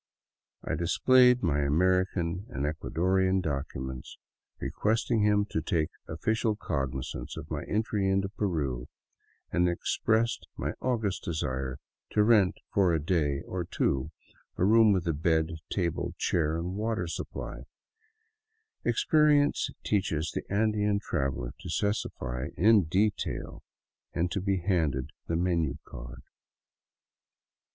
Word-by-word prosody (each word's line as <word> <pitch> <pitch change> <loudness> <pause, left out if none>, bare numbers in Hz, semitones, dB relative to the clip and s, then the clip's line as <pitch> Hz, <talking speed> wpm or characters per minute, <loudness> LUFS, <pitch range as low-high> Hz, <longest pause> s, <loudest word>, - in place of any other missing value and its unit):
I - - -2
displayed 125 +9 +4
my 75 -5 +2
American 90 +4 +1
and 70 +2 -3
Ecuadorian 95 +5 +1
documents, 70 -5 -4 0.4
re - - -3
questing 110 +1 +1
him 105 -1 +3
to 80 - 0
take 80 -1 0 0.2
official 110 +6 0
cognizance 70 -9 -4
of 75 - -8
my 75 -2 -2
entry 105 -2 0
into 95 0 +1
Peru, 75 - -2 0.6
and 90 0 +3
ex 85 - -2
pressed 115 +1 +1
my - - -2
august 115 -6 0
desire 65 -5 -2 0.4
to 105 - +4
rent 105 -4 +4 0.2
for 95 -3 +4
a 80 - +2
day 75 -3 0
or 90 -1 -3
two 70 -3 0 0.5
a 90 - +2
room 110 +1 +6
with 95 -3 +1 0.2
bed, 80 -1 +2 0.2
table, 85 -4 -1
chair 80 -2 +1
and 85 +2 -3
water 110 -1 -1
supply 85 - -6 0.6
— 440 0 -50
experience 150 - +3
teaches 85 -6 0
the - - -3
Andean 105 -1 +2
trav 70 -9 -1
eler - - -5
to - - -8
specify 65 - -2
in 105 0 +5
detail 100 +6 -1 0.3
— - - -56
and 85 +1 0
to 100 - -1
be 95 -1 0
handed 80 -8 0 0.2
the 85 - 0
menu 85 -4 +1
card. - - -10
90 Hz, 130 wpm, -29 LUFS, 80-105 Hz, 0.6 s, room